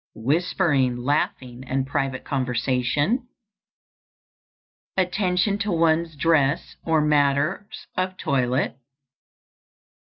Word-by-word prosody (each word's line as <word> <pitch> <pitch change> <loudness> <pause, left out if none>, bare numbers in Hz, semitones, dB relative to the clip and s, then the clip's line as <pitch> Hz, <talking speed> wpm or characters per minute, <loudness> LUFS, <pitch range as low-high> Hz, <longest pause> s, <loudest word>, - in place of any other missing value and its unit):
_ - - -
Whispering, 140 - +1
laughing, 130 -1 -2
and 130 +1 -1
private 135 -2 -2
conversation. 130 - 0 1.7
_Attention 185 +2 +1
to 205 -1 -1
one's 165 -1 +2
dress 145 -2 +1
or 160 -2 +2
matters 150 +7 +1
of 185 0 -2
toilet. 130 -2 0
145 Hz, 85 wpm, -24 LUFS, 130-180 Hz, 1.7 s, one's